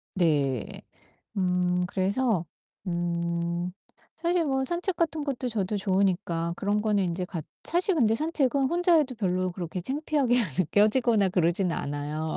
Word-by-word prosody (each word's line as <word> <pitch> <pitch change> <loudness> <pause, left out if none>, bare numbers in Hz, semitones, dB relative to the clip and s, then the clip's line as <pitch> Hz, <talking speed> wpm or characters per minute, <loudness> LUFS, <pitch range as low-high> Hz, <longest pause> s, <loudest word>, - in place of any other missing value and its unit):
네. 140 - 0 0.6
음 180 -1 +1
그래서 195 +1 0 0.4
음 170 0 -2 0.4
사실 340 +1 +1
뭐 265 -2 0
산책 345 +4 +1
같은 320 -3 -1
것도 255 -3 -2
저도 210 -3 -1
좋으니까 185 -4 0
그런 205 +1 0
거는 205 -5 +1
이제 180 +2 -2
같 170 -4 -6 0.2
사실 360 +3 +4
근데 225 -8 +3
산책은 280 -2 +1
혼자 350 +4 +2
해도 285 -5 +1
별로 185 -4 -1
그렇게 175 0 -5
창피하게 275 - 0 0.2
느껴지거나 210 - +3
그러진 175 +1 +1
않아요. 150 +2 -3
195 Hz, 285 characters per minute, -27 LUFS, 175-265 Hz, 0.6 s, 사실